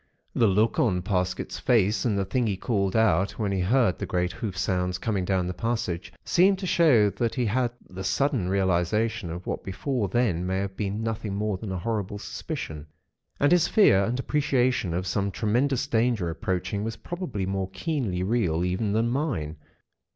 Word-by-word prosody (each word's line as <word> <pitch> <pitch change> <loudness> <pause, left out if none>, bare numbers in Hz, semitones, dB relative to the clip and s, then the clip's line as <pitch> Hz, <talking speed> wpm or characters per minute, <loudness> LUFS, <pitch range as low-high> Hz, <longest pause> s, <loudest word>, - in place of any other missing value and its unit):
"The 115 - +3
look 105 +4 +2
on 90 -7 +2
Parsket's 90 -1 -2
face, 110 -4 +2
and 110 -4 +1
the 100 - 0
thing 120 +5 0
he 100 -3 -1
called 100 -4 -1
out, 100 -4 +3
when 105 -3 -1
he 95 - 0
heard 110 +1 +2
the - - -3
great 90 0 0
hoof 95 -1 -5
sounds 90 -1 0
coming 100 -2 -1
down 95 -1 +1
the 90 - -3
passage, 95 -3 -2
seem 190 +3 +4
to 190 0 -6
show 140 - +4
that 115 +4 -2
he 125 -3 0
had 120 +3 +1 0.2
the 95 +1 -7
sudden 135 - 0
realisation 95 +2 +1
of 85 +2 -6
what - - -3
before 110 +3 -2
then 95 -6 +1
may 95 0 0
have 95 0 -3
been 105 +2 -3
nothing 110 -3 -3
more 105 0 -1
than 100 0 -6
a 95 - -2
horrible 105 +1 -2
suspicion. 75 -6 -6 0.5
And 145 - +3
his 175 -2 +5
fear 100 - +5
and 120 +5 -1
appreciation 130 - +1
of 90 +1 -2
some 100 +2 0
tremendous 125 +7 0
danger 115 - +1
approaching 95 +4 -2
was 115 0 -3
probably 175 - -4
more 95 0 -2
keenly 110 - -2
real 95 -6 +1
even 95 +3 -1
than 115 +2 +2
mine. 105 - -2
100 Hz, 185 wpm, -26 LUFS, 95-120 Hz, 0.5 s, his